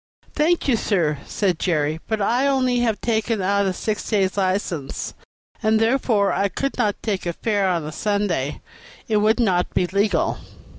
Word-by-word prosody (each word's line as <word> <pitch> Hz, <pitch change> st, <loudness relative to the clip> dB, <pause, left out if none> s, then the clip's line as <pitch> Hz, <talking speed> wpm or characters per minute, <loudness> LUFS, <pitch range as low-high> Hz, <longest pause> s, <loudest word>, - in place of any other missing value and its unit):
"Thank 325 Hz, +2 st, +1 dB
you, 260 Hz, -, +4 dB
sir," 165 Hz, -10 st, 0 dB
said 185 Hz, -5 st, 0 dB
Jerry, 155 Hz, -3 st, 0 dB
"but 220 Hz, -1 st, -1 dB
I 235 Hz, +5 st, +2 dB
have 280 Hz, 0 st, +3 dB
only 245 Hz, -4 st, +1 dB
taken 225 Hz, -1 st, 0 dB
out 200 Hz, +1 st, +1 dB
a -, -, +1 dB
six 210 Hz, +3 st, -3 dB
days' 195 Hz, -4 st, +1 dB
license,* 185 Hz, -7 st, -2 dB, 0.5 s
and 220 Hz, -1 st, +3 dB
therefore 225 Hz, -3 st, +2 dB
I 200 Hz, -, +1 dB
could 275 Hz, +7 st, -3 dB
not 205 Hz, -1 st, +1 dB
take 195 Hz, -4 st, -2 dB
a 170 Hz, -, -1 dB
fare 205 Hz, 0 st, 0 dB
on 170 Hz, -4 st, -1 dB
a 155 Hz, -, -5 dB
Sunday; 195 Hz, -8 st, -1 dB, 0.5 s
it 215 Hz, -, +2 dB
would 215 Hz, +3 st, +3 dB
not 185 Hz, -6 st, +1 dB
be 180 Hz, -, +3 dB
legal." 200 Hz, 0 st, 0 dB
205 Hz, 170 wpm, -22 LUFS, 180-225 Hz, 0.5 s, you